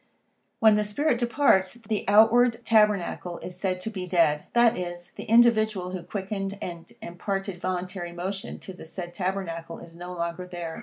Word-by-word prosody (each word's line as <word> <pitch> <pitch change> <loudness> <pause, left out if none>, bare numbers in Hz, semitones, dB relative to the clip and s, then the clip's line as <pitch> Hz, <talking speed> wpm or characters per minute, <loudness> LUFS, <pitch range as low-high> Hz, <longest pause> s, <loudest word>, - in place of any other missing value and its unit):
When 220 -2 +6
this 210 -1 0
spirit 245 +3 +1
departs, 235 -6 +3
the 220 -3 -3
outward 230 +3 +5
tabernacle 210 -5 +2
is 180 - -8
said 185 -2 -1
to 220 - -4
be 185 -4 -5
dead, 165 -4 +2
that 235 -1 +5
is, 175 -1 -6
the - - -9
individual 220 -5 +4
who 185 -1 -4
quickened 195 +1 -4
and 170 -2 -7
imparted 195 +1 -4
voluntary 180 -1 -3
motion 190 +3 -5
to 190 - -8
the 180 - -11
said 175 +1 -7
tabernacle 175 -3 -3
is 165 0 -13
no 175 +1 -8
longer 170 +1 -4
there. 170 -2 -6
190 Hz, 165 wpm, -26 LUFS, 175-215 Hz, -, When